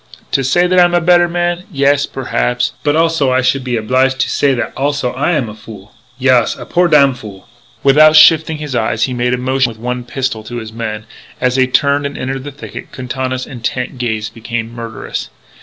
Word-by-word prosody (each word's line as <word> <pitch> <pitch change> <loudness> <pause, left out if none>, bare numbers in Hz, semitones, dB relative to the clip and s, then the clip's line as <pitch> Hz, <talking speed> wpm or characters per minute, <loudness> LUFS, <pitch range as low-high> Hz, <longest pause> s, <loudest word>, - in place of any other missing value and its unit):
To 135 - +1
say 175 +8 +2
that 180 0 +3
I - - +8
am 175 0 +2
a - - +4
better 175 +1 +4
man? 175 +1 -1
Yes, 140 0 +2
perhaps. - - -1
But 145 0 +1
also 165 -4 +2
I 130 0 +2
should 130 +1 0
be 125 -2 -1
oblige 130 +4 +1
to 130 - -1
say 140 -2 +2
that 120 -2 -3
also 140 -2 -1
I 140 +7 0
am 135 -7 0
a 105 - -8
fool. 105 -2 -13 0.2
Yaas! 130 -3 +2
A - - -8
poor 180 0 +2
damfool." 130 - +1 0.4
Without 155 +3 +6
shifting 160 0 +6
his 150 -3 -6
eyes 110 -1 0
he 130 - 0
made 125 0 0
a - - -5
motion 130 0 0
with 115 - -10
one 125 +2 -4
pistol 125 -2 -3
to 120 - -7
his 110 -2 -7
men. 110 -2 -5 0.3
As 125 0 +1
they 130 -1 +3
turned 140 +2 +1
and 140 - -8
entered 135 +1 -4
the 145 - -6
thicket, 140 +2 -10
Quintana's 130 0 -4
intent 125 +1 -4
gaze 110 -3 -2
became 115 0 -5
murderous. 115 -2 -6
130 Hz, 205 wpm, -15 LUFS, 120-145 Hz, 0.4 s, I